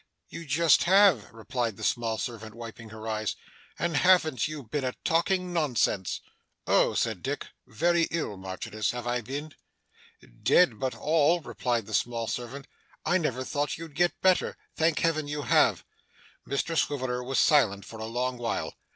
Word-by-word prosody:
'You 165 -1 -8
just 155 +2 +4
have!' 185 - +5
replied 115 -1 -3
the - - -8
small 115 -2 0
servant, 110 -2 -6
wiping 115 -1 -9
her 110 +1 -9
eyes. 110 -1 -2 0.4
'And 170 -3 0
haven't 170 -6 +4
you 155 -2 -6
been 130 +5 -3
a 130 -1 -1
talking 180 +2 +1
nonsense!' 125 - 0 0.4
'Oh!' - - +3
said 110 -6 0
Dick. 145 +2 -4 0.2
'Very 170 +7 +2
ill, 160 -11 -2
Marchioness, 95 +3 -4
have 120 -1 -5
I 120 0 0
been?' 140 +6 -6 0.9
'Dead, 135 +4 +5 0.3
all 160 +2 +3
but,' 160 - -16
replied 120 -3 -1
the 110 - -9
small 115 +2 0
servant. 125 +4 -5 0.4
'I 185 - +3
never 130 -6 -1
thought 145 +3 -2
you'd 165 -2 -9
get 175 +4 +1
better. 185 -1 +2 0.2
Thank 160 -1 +2
Heaven 155 -3 +1
you 145 0 -3
have!' 120 - +3 0.6
Mr 140 +4 -1
Swiveller 130 -5 0
was 135 +2 -2
silent 100 -10 +4
for 110 - -10
a 110 - -4
long 125 +2 -2
while. 115 -1 -2
130 Hz, 160 wpm, -28 LUFS, 115-160 Hz, 0.9 s, have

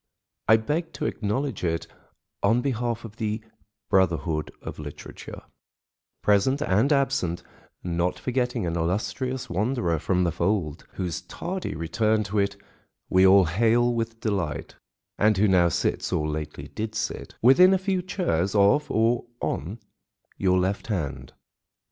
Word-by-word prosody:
I 110 - +7
beg 155 +9 -2
to - - -4
acknowledge 110 +2 -2
it 85 -1 -1 0.6
on 110 +4 +3
behalf 120 -3 -2
of 110 0 -11
the 110 0 -2 0.4
brotherhood 85 -5 +1
of - - -8
literature, 75 -1 -9 0.8
present 105 +7 +3
and 115 0 +2
absent, 135 - +1 0.4
not 85 0 -1
forgetting 125 -4 -1
an 85 -1 -2
illustrious 125 +9 -2
wanderer 90 - 0
from 90 +3 +1
the 85 - +1
fold, 85 -2 -1
whose 90 -3 -3
tardy 185 +2 -5
return 105 +6 +1
to 105 +1 -1
it 100 0 0 0.5
we 95 +1 +6
all 95 0 +7
hail 115 +7 +2
with 115 -1 -3
delight, 95 - -2 0.4
and 105 -1 +4
who 105 +2 +4
now 90 -3 +4
sits—or 75 -1 -1
lately 75 -1 -5
did 110 0 -5
sit—within 135 +10 +3
a 190 - +4
few 190 -1 -1
chairs 135 - -1
of 100 +9 +4
or 115 +2 +1
on 85 - -3 0.6
your 95 -1 +2
left 95 +3 -1
hand. 85 -11 -3
105 Hz, 135 wpm, -25 LUFS, 90-120 Hz, 0.8 s, I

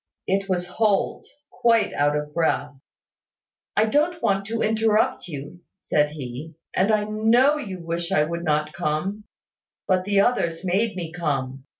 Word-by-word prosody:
It 195 +1 0
was 180 -1 0
Holt, 200 +2 0 0.2
quite 230 -2 +2
out 145 +1 +2
of 150 0 -5
breath. 160 -3 0 1.0
"I 215 - +5
don't 305 +9 +1
want 195 -7 +1
to 225 +1 -1
interrupt 220 -3 +1
you," 145 +2 -8 0.2
said 150 0 0
he, 145 +2 -7 0.2
"and 195 +4 +3
I 215 -1 +2
know 225 +7 +3
you 200 -10 -5
wish 170 +1 -3
I 150 - +4
would 170 +2 -3
not 150 -1 0
come; 185 +8 -2 0.6
but 185 -1 +2
the 200 0 +2
others 170 -7 0
made 205 +4 +1
me 170 -3 -5
come. 135 -5 -3
185 Hz, 155 wpm, -24 LUFS, 155-215 Hz, 1.0 s, I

